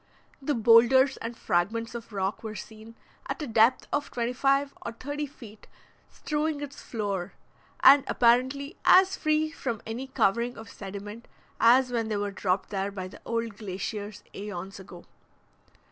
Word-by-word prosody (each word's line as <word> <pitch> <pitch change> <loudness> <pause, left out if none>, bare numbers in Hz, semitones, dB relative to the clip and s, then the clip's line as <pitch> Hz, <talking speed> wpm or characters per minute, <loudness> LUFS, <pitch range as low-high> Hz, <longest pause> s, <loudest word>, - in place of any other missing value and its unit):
The 285 +1 0
boulders 240 +4 +5
and 230 +1 -6
fragments 220 +6 -1
of 235 -1 -8
rocks 195 0 -2
were 220 -1 -6
seen, 220 +3 -10 0.3
at - - -4
a - - -2
depth 230 0 +3
of 290 0 -1
twenty 240 0 -2
five 275 +2 +1
or 235 - -5
thirty 290 +5 -4
feet, 220 -6 -14 0.4
strewing 300 -1 -2
its 280 -1 -7
floor, 200 -5 -3 0.5
and 275 +1 +8
apparently 260 +6 +2
as 380 +1 +6
free 310 0 +1
from 240 -8 -4
any 235 +4 -5
covering 235 -1 +1
of 225 -2 -10
sediment 205 +3 -8 0.3
as 250 +2 +5
when 230 -2 -1
they 215 -2 -1
were 205 0 -2
dropped 190 0 -1
there 195 0 -1
by 190 -2 -6
the - - -14
old 230 -3 -2
glaciers 205 +1 -5
aeons 195 -1 -7
ago. 180 -2 -12
230 Hz, 155 wpm, -27 LUFS, 205-265 Hz, 0.5 s, and